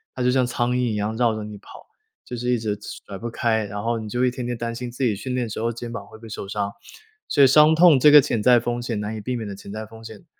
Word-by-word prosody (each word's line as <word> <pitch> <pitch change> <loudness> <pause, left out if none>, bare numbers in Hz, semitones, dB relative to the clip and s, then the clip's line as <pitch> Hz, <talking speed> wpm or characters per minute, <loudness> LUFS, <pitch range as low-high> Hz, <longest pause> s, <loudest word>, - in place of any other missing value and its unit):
它 125 - -2
就 125 - +3
像 130 -1 +3
苍 120 0 -1
蝇 - - 0 0.2
一 - - -2
样 105 +1 -2
绕 115 -1 +2
着 110 - -5
你 105 0 -8
跑， - - -14 0.4
就 125 - -6
是 125 +1 -3
一 125 - +2
直 110 -2 -2 0.3
甩 100 - -7
不 120 - -4
开， 115 -2 0
然 100 0 -6
后 115 0 -1
你 110 - -7
就 125 +3 0
一 125 - +2
天 125 -1 -5
天 120 -1 -3
担 115 0 -3
心 125 +1 -5
自 125 +3 -4
己 115 -5 +2
训 125 +5 -4
练 125 -1 0
的 115 - -7
时 - - -5
候 115 +1 0
肩 120 +1 -7
膀 105 -4 -7
会 - - -13
不 110 - -21
会 - - -9
受 100 - -6
伤。 100 0 -3 0.5
所 140 - +4
以 - - +8
伤 150 +4 +6
痛 160 -4 +6
这 150 - +7
个 150 - +10
潜 120 -4 -1
在 120 +2 +6
风 120 +1 -3
险 115 -3 -3
难 105 +1 -4
以 110 - -6
避 125 +4 -3
免 115 -3 -4
的 100 - -6
潜 100 - -11
在 110 +1 -6
风 110 +1 -14
险， 110 -2 -11
115 Hz, 345 characters per minute, -23 LUFS, 110-125 Hz, 0.5 s, 个